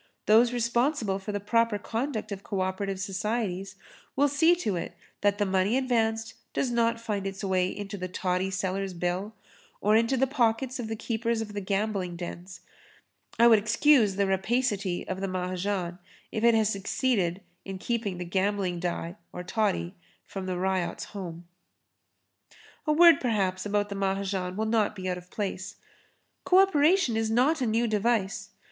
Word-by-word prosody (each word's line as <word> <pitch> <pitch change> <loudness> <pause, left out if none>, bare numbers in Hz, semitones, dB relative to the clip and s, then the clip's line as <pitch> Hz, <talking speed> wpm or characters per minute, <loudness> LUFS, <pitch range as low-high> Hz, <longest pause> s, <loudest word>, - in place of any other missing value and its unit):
Those 230 +3 +5
responsible 235 -3 0
for 195 +2 -5
the 205 - -2
proper 230 +1 +2
conduct 220 +1 -3
of 195 -1 -5
co 195 -1 -3
operative 190 +1 -2
societies 195 -1 -2 0.4
will 285 +1 +4
see 320 +5 +4
to 220 - -2
it 170 - -5 0.2
that 205 0 +2
the 205 - +1
money 190 +5 +2
advanced 225 -3 0 0.2
does 255 - 0
not 230 -1 +1
find 210 -4 -3
its 195 +1 -6
way 185 -2 +1
into 200 +1 -6
the 185 - -3
toddy 185 +1 -1
seller's 190 0 -2
bill 180 +5 -2 0.4
or 210 +2 +3
into 230 +4 +3
the 265 - +3
pockets 255 -1 0
of 235 - -3
the 225 - -3
keepers 230 +1 -1
of 215 -2 -5
gambling 195 -3 -1
dens. 175 +1 -8 0.8
I 235 - +6
would 225 -2 +7
excuse 220 0 +4
the 200 0 +2
rapacity 195 -1 0
of 185 0 -4
the 195 - -1
Mahajan 185 0 -2 0.3
if 220 - -3
it 235 -1 +6
has 220 -2 +3
succeeded 195 -3 0 0.2
in 195 -1 -6
keeping 210 -2 -2
the 180 - -5
gambling 190 0 0
die 175 +1 -3
or 180 - -6
toddy 195 -2 -1 0.3
from 190 -1 -6
the 185 -1 -2
ryot's 185 -1 -1
home. 175 -4 -7 1.4
A - - +4
word 335 0 +7
perhaps 195 -5 0
about 205 0 0
the 200 - -4
Mahajan 195 -1 -2
will 220 - 0
not 220 -1 +1
be 185 -2 -5
out 180 -1 -2
of 180 0 -18
place. 195 -1 -4 0.7
Co 365 - +4
operation 360 - +4
is 225 0 0
not 265 +7 +2
a 250 - +1
new 225 +2 +2
device. 210 -2 0
205 Hz, 165 wpm, -28 LUFS, 190-230 Hz, 1.4 s, would